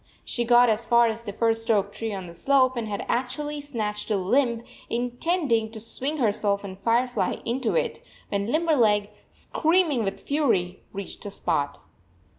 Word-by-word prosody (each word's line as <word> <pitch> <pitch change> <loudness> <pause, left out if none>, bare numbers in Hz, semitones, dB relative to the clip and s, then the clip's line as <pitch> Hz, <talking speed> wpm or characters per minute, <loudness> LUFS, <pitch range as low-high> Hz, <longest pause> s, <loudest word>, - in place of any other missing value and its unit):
She 240 - -1
got 240 +1 +6
as 225 +1 0
far 235 0 +5
as 225 0 -1
the 220 -3 -6
first 225 +2 0
oak 200 -2 +2
tree 225 -1 -4
on 190 -2 -5
the 170 - -10
slope 260 +6 +3
and 230 -2 -3
had 205 -1 -4
actually 290 +4 -2
snatched 220 -8 -4
a 210 - +2
limb, 235 +4 +1 0.3
intending 245 0 0
to 220 - -6
swing 260 +7 -2
herself 205 -5 +1
and 190 -2 -7
Firefly 235 +5 +1
into 245 +1 -1
it, - - -1 0.3
when 200 0 -1
Limberleg, 235 -11 +2 0.2
screaming 320 -6 +1
with 195 -1 -3
fury, 210 - 0
reached 200 -1 -7
the 205 - -5
spot. 150 -7 -2
230 Hz, 165 wpm, -25 LUFS, 205-260 Hz, 0.3 s, got